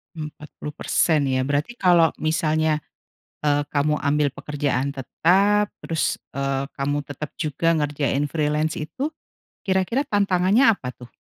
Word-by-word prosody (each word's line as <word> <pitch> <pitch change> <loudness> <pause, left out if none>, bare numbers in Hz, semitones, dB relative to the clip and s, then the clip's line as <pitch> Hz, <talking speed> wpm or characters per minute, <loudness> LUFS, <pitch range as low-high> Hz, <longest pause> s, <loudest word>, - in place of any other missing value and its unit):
40% 150 0 -1
ya, 130 0 +1
berarti 145 - -1
kalau 175 -5 +5
misalnya, 155 0 +1 0.7
eee, 145 -1 +3
kamu 150 +1 +1
ambil 145 0 +2
pekerjaan 140 -2 -2
tetap, 195 +10 +2 0.2
terus, 160 -1 0 0.2
eee, 135 0 -1
kamu 145 +1 0
tetap 145 +1 -6
juga 165 +2 +1
ngerjain 145 -1 0
freelance 150 +1 0
itu 255 - -4 0.5
kira-kira 190 +8 +1
tantangannya 200 +4 +3
apa 125 - -7
tuh? 125 -1 -14
150 Hz, 115 wpm, -23 LUFS, 145-175 Hz, 0.7 s, kalau